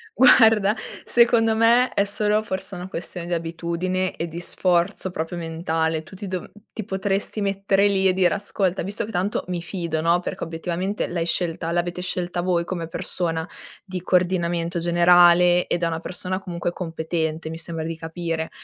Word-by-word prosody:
Guarda, 220 -5 +6 0.3
secondo 235 -2 +4
me 235 +3 +4
è 200 - +3
solo 210 +1 +1
forse 190 0 -4
una 180 +1 -7
questione 175 -1 -5
di 175 - -3
abitudine 170 +3 -2
e 170 - -2
di 170 +1 -7
sforzo 180 +2 +1
proprio 165 +1 -4
mentale, 160 -1 -1
tu 160 - -13
ti 200 +1 -7
dov 185 -1 -5 0.2
ti 220 - -4
potresti 195 +1 -2
mettere 195 0 +2
lì 195 -1 +1
e 185 - +3
dire: 180 -2 +3
"Ascolta, 195 -2 -1
visto 205 +4 -2
che 225 - -8
tanto 195 +1 -1
mi 180 -2 -3
fido, 170 -2 -3
no?" 170 +2 +3
Perché 175 - -5
obiettivamente 175 +4 -3
l'hai 170 -1 -2
scelta 165 -1 -1
l'avete 175 +1 -1
scelta 180 -1 -2
voi 175 -1 0
come 170 -3 -4
persona, 165 -1 -2 0.4
di 185 -2 -5
coordinamento 175 -1 0
generale 175 +1 +5
ed 175 - -1
è 170 - +3
una 165 -1 -2
persona 185 +1 -4
comunque 175 -2 -3
competente, 160 -2 -3
mi 160 - -6
sembra 165 -1 -4
di 165 0 -3
capire. 165 0 -4
175 Hz, 170 wpm, -23 LUFS, 170-190 Hz, 0.4 s, Guarda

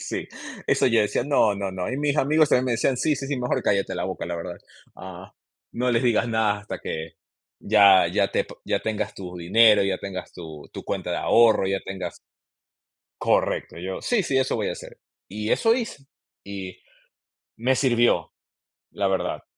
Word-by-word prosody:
sí, - - -4 0.4
eso - - +3
yo 115 -3 +4
decía: 105 +3 -1
"No, 120 -7 +3
no, 100 -1 -3
no". 95 +2 -3
Y - - -2
mis 145 0 0
amigos 150 +1 +3
también 125 +1 +2
me 125 - +1
decían: 125 +3 +1
"Sí, 150 +4 +1
sí, 135 - -5
sí, 140 - -2
mejor 125 0 -1
cállate 100 -1 0
la - - -2
boca, - - -4
la 85 - -4
verdad, 85 +1 -6 0.4
ah, 95 +1 -10 0.4
no 125 +1 0
les 115 +1 +2
digas 120 -1 +2
nada 110 -2 +1
hasta 105 - -7
que 80 0 -6 0.4
ya, 100 -3 +6
ya - - +1
te - - 0 0.2
ya - - 0
tengas 110 -1 -3
tu 90 -2 -8
dinero, 105 +5 +5
ya 95 -1 -1
tengas 95 -2 -7
tu 80 -4 -10
tu - - -8
cuenta - - -3
de - - -1
ahorro, 115 -4 +4
ya 95 0 -1
tengas" 95 -2 -6 1.0
Correcto, - - 0
yo: 95 +2 -5
"Sí, 230 -6 +1
sí, 135 -5 0
eso 130 0 +1
voy - - -1
a - - -3
hacer". - - -12 0.3
Y 105 +2 -4
eso 225 0 +3
hice, 230 - -4 0.4
y 95 -2 -7 0.8
me 125 +3 +1
sirvió, 120 -3 +2 0.6
la 100 - -1
verdad. 95 -1 -2
105 Hz, 185 wpm, -24 LUFS, 95-125 Hz, 1.0 s, ya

